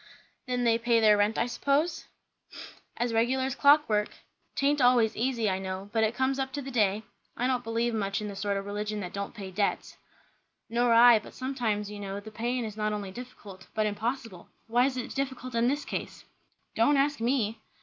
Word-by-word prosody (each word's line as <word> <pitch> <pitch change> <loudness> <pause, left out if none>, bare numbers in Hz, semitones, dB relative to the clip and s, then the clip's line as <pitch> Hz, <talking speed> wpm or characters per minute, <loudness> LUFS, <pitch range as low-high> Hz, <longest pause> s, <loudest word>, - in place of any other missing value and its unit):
"Then 250 -1 -1
they 230 -1 +3
pay 235 0 +3
their 215 -2 +6
rent, 205 +2 +1
I - - +2
suppose?" 285 +6 0 0.9
"As 240 0 -1
regular 245 +4 +2
as 265 0 -1
clockwork. 280 -8 +4 0.5
'Taint 285 +1 +2
always 245 -3 +4
easy, 235 -1 0
I 190 -1 0
know; 190 +1 -6
but 225 -1 +2
it 220 +2 +1
comes 265 +1 0
up 265 0 -2
to 285 - -3
the 270 - -7
day. 210 -3 +1 0.3
I 245 - 0
don't 255 -1 0
believe 230 +1 -1
much 200 -2 -1
in 210 - -4
the 200 - -6
sort 200 +1 -1
o' - - -2
religion 210 +1 -4
that 180 -2 -6
don't 200 +2 -5
pay 195 -3 -7
debts." 200 +2 -2 0.7
"Nor 240 +1 +2
I; 235 0 +8
but - - -14
sometimes, 230 -6 -2
you 205 - -7
know, 200 0 -5
the 215 +2 -11
paying 240 +2 -2
is 215 -2 -6
not 215 0 -1
only 200 -2 -4
difficult 200 -5 -11
but 215 - +1
impossible. 215 -2 -4 0.2
Why 240 +3 +3
is 260 -2 -4
it 250 - -4
difficult 260 -2 -4
in 230 +1 +2
this 285 +3 -1
case?" - - -6 0.5
"Don't 255 +6 +3
ask 285 +1 +1
_me! 230 -2 0
230 Hz, 200 wpm, -28 LUFS, 210-255 Hz, 0.9 s, I